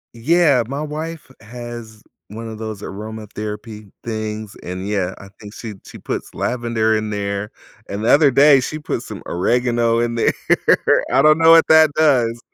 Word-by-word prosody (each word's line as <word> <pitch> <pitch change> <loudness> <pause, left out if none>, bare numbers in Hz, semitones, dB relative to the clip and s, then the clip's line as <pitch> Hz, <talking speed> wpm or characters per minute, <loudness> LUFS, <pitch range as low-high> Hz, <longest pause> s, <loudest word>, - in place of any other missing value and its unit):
Yeah, 145 +1 +3
my 140 +3 -4
wife 155 0 -6
has 120 -1 -9 0.2
one 115 +2 -8
of 110 -1 -8
those 110 -2 -6
aromatherapy 105 0 -7
things, 110 -2 -5
and, 90 +2 -6
yeah, 95 -3 -2
I 95 - -13
think 105 +1 -11
she 110 -3 -7
she - - -11
puts - - -6
lavender 115 -2 0
in 110 0 -2
there, 100 0 -3 0.4
and 100 +2 -4
the - - +2
other 145 -1 +6
day, 140 +1 +6
she 150 +4 -4
put 150 - -4
some - - -9
oregano 115 +4 +1
in 120 0 0
there, 115 - +2 0.8
I 135 - +4
don't 155 +1 +5
know 165 0 +5
what 165 0 +7
that 160 0 +7
does, 125 -7 +2
115 Hz, 170 wpm, -19 LUFS, 105-135 Hz, 0.8 s, what